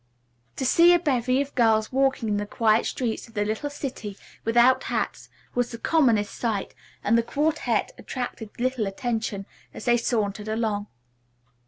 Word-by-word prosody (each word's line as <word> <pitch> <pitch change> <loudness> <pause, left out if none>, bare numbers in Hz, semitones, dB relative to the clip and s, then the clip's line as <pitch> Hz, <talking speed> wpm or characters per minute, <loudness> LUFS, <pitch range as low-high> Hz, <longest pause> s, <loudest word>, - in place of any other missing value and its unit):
To 265 - -2
see 340 +6 +6
a - - +3
bevy 260 -4 +1
of 280 - -14
girls 220 -3 +3
walking 270 -3 +1
in 205 -1 +1
the 205 0 -3
quiet 220 0 +2
streets 235 -4 -3
of 230 - -20
the 205 0 +1
little 220 +7 -2
city 255 -8 -6 0.3
without 240 +3 +4
hats - - -3 0.2
was 245 0 0
the 230 - -7
commonest 230 -8 +2
sight, 220 -5 -2 0.3
and 215 - +3
the 230 - +5
quartette 295 +7 0
attracted 245 -4 -5
little 250 -3 0
attention 220 -1 -3 0.3
as - - -8
they 240 -1 +4
sauntered 215 -3 -1
along. 215 -2 -1
235 Hz, 160 wpm, -25 LUFS, 215-260 Hz, 0.3 s, see